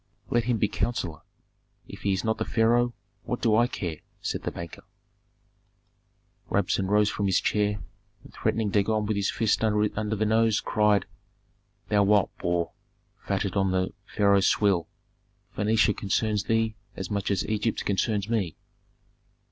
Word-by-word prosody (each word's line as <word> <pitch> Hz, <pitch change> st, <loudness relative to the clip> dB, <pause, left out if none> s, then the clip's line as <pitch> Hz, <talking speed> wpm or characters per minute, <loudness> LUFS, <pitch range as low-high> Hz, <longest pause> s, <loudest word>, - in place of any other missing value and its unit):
"Let 120 Hz, -1 st, +2 dB
him 120 Hz, -1 st, +1 dB
be 105 Hz, -, +2 dB
counsellor; 95 Hz, -8 st, -2 dB, 0.7 s
if -, -, -10 dB
he 100 Hz, -, +1 dB
is 95 Hz, 0 st, 0 dB
not 110 Hz, -1 st, 0 dB
the -, -, +1 dB
pharaoh, 120 Hz, +2 st, +2 dB, 0.3 s
what 125 Hz, -, -3 dB
do 110 Hz, -3 st, +3 dB
I 120 Hz, +2 st, +4 dB
care?" 85 Hz, -9 st, -4 dB, 0.2 s
said -, -, -3 dB
the -, -, -2 dB
banker. 85 Hz, -1 st, -8 dB, 1.7 s
Rabsun 95 Hz, -1 st, +1 dB
rose 105 Hz, +1 st, +3 dB
from 100 Hz, -, -1 dB
his 95 Hz, -, +3 dB
chair, 105 Hz, -1 st, 0 dB, 0.4 s
and -, -, -15 dB
threatening 110 Hz, -2 st, 0 dB
Dagon 105 Hz, +1 st, +1 dB
with 105 Hz, 0 st, -1 dB
his 100 Hz, -1 st, 0 dB
fist 110 Hz, -1 st, +1 dB
under 105 Hz, 0 st, +1 dB
the 110 Hz, +1 st, 0 dB
nose, 110 Hz, 0 st, +3 dB
cried, 105 Hz, -2 st, +2 dB, 0.8 s
"Thou 105 Hz, -1 st, +4 dB
wild 100 Hz, 0 st, +3 dB
boar, 85 Hz, -1 st, 0 dB, 0.5 s
fatted -, -, -1 dB
on 95 Hz, -1 st, +2 dB
the 95 Hz, +1 st, 0 dB
pharaoh's 100 Hz, -2 st, +3 dB
swill, 95 Hz, -5 st, +2 dB, 0.7 s
Phœnicia 110 Hz, 0 st, +2 dB
concerns 105 Hz, +1 st, 0 dB
thee 115 Hz, -1 st, +1 dB, 0.2 s
as 95 Hz, 0 st, -5 dB
much 100 Hz, -1 st, -1 dB
as 100 Hz, -3 st, 0 dB
Egypt 110 Hz, +1 st, -1 dB
concerns 100 Hz, +1 st, 0 dB
me. 105 Hz, -8 st, -1 dB
105 Hz, 150 wpm, -27 LUFS, 100-110 Hz, 1.7 s, I